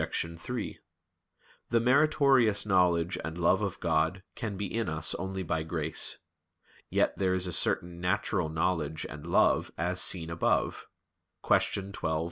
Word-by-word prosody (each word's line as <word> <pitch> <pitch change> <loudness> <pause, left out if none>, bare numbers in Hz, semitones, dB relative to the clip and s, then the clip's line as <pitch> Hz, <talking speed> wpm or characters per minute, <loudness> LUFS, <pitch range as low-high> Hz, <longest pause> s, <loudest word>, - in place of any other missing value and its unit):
3: 85 +8 -4 0.9
The 115 - +3
meritorious 130 -4 +3
knowledge 90 -2 +2
and 80 +2 -5
love 90 +3 +3
of 100 -4 -3
God 80 +5 0
can 105 -4 -5
be 100 - -2
in 110 +2 -2
us 80 +1 0
only 95 +1 -4
by 80 -2 -1
grace. 80 -1 -1 0.7
Yet - - +1
there 95 -1 +2
is 90 0 +1
a 90 - -3
certain 85 +1 0
natural 90 -3 0
knowledge 80 -2 -1
and 75 +3 -9
love 85 - +3
as 90 +2 0
seen 85 -3 +2
above 85 - 0 0.6
(Q. 100 -1 +1
12, - - -10
A. 80 -1 0
90 Hz, 145 wpm, -29 LUFS, 80-100 Hz, 0.9 s, The